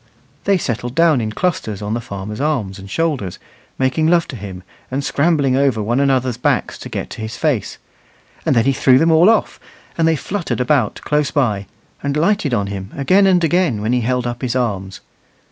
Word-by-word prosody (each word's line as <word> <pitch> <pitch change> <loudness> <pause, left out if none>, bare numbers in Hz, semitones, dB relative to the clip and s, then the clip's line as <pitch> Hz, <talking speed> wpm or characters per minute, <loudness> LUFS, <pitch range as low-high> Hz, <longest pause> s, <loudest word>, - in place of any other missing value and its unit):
They 200 -1 +3
settled 120 -5 -3
down 165 -6 +4
in 110 -1 -2
clusters 110 - -2
on 105 +1 -3
the 120 - -2
farmer's 105 +2 -6
arms 115 -11 -1
and 95 +1 -10
shoulders, 140 - -1 0.4
making 135 +4 +1
love 170 0 +3
to 135 - -6
him 95 -4 -8 0.3
and 135 +2 -2
scrambling 140 -3 +2
over 135 -4 +2
one 115 +5 0
another's 130 -3 +1
backs 125 - 0
to - - -8
get - - -5
to - - -7
his 110 +1 -5
face; 145 - -1 0.7
and - - +1
then 115 -1 +3
he 135 - +3
threw 130 -1 +4
them 165 +4 +3
all 165 +5 +6
off, 225 - +1 0.4
and 165 - +4
they 165 - +3
fluttered 185 +1 -3
about 125 -3 +1
close 150 -1 +1
by, 105 -9 0 0.3
and 140 +1 -1
lighted 170 -2 +1
on 105 -4 +1
him 100 0 -6
again 185 +8 +4
and 180 -2 +3
again 165 - +2
when 110 +3 -1
he 125 - +2
held 125 +1 0
up 120 0 -4
his 125 -1 -2
arms. 100 -6 -2
130 Hz, 200 wpm, -18 LUFS, 110-155 Hz, 0.7 s, all